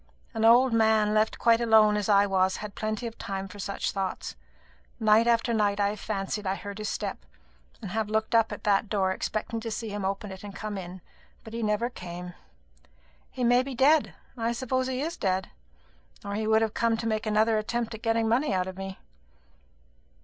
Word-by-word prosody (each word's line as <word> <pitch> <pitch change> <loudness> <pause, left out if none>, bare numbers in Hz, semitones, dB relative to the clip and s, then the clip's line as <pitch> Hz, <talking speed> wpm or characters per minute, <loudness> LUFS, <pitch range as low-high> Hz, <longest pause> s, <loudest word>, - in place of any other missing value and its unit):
An 225 -1 -2
old 240 +2 +6
man 220 -2 +3
left 215 +1 +2
quite 230 0 +3
alone 220 -2 +5
as 210 0 -1
I 200 0 +5
was 190 -1 +1
had 210 -1 -7
plenty 215 +3 -3
of 230 -1 -7
time 195 0 -4
for 205 +2 -12
such 200 +1 -2
thoughts. 195 - -4 0.6
Night 220 +1 +4
after 235 0 +2
night 205 -2 +1
I 200 0 +3
have 210 0 -5
fancied 200 0 -3
I 190 - 0
heard 200 +1 -8
his 215 - -3
step, - - -4 0.6
and 195 - -5
have 220 -1 -1
looked 220 +1 -1
up 225 -1 +4
at - - -7
that 205 0 +2
door 190 -3 +1
expecting 215 +4 -3
to 225 0 -5
see 225 0 -4
him 205 -1 -4
open 195 +1 -3
it 190 +1 -10
and 200 -1 -8
come 215 -1 -5
in; 185 -1 -7 0.4
but 220 - -11
he 230 - -3
never 210 +2 +1
came. 180 -5 -8 1.0
He 255 - -4
may 245 +1 +5
be 265 0 -6
dead. 290 +5 +3 0.2
I 230 -1 -1
suppose 260 +1 -1
he 260 0 -2
is 330 +3 -3
dead; 190 -2 -1 0.7
or 200 - -4
he 215 +1 -2
would 220 0 +4
have 220 -1 -1
come 230 -1 +1
to 225 - -5
make 220 0 -1
another 215 +1 +3
attempt 235 +2 -2
at 220 - -8
getting 225 -1 +1
money 245 +5 +2
out 180 -1 +1
of 190 0 -7
me." 195 0 -6
215 Hz, 210 wpm, -27 LUFS, 200-230 Hz, 1.0 s, old